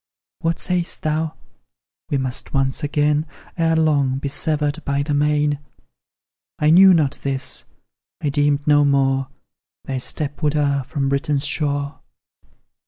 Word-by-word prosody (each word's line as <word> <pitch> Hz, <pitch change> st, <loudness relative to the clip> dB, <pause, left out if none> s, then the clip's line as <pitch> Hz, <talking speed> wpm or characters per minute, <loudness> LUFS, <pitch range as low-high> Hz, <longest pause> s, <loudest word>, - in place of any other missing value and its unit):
What 165 Hz, 0 st, -1 dB
sayst 180 Hz, -2 st, -2 dB
thou?" 155 Hz, 0 st, -1 dB, 0.7 s
We 140 Hz, -, +1 dB
muse 130 Hz, -2 st, -2 dB
once 135 Hz, 0 st, 0 dB
again, 150 Hz, +1 st, +1 dB, 0.3 s
Ere 165 Hz, -1 st, +1 dB
long, 145 Hz, -5 st, +2 dB
be 140 Hz, +1 st, -3 dB
severed 150 Hz, +1 st, -1 dB
by 140 Hz, 0 st, 0 dB
the 145 Hz, 0 st, -2 dB
main!" 150 Hz, 0 st, +1 dB, 1.0 s
I 150 Hz, +1 st, +3 dB
knew 190 Hz, +3 st, +8 dB
not 150 Hz, -5 st, +2 dB
this 135 Hz, -1 st, -1 dB, 0.5 s
I 145 Hz, -, -1 dB
deemed 145 Hz, 0 st, +1 dB
no 145 Hz, -1 st, +5 dB
more 135 Hz, -1 st, +2 dB, 0.6 s
Thy 135 Hz, -1 st, -3 dB
step 145 Hz, +3 st, -3 dB
would 150 Hz, -1 st, +1 dB
err 140 Hz, -2 st, +1 dB
from 140 Hz, -2 st, -2 dB
Britain's 140 Hz, +1 st, 0 dB
shore. 145 Hz, -1 st, -1 dB
145 Hz, 135 wpm, -21 LUFS, 140-155 Hz, 1.0 s, knew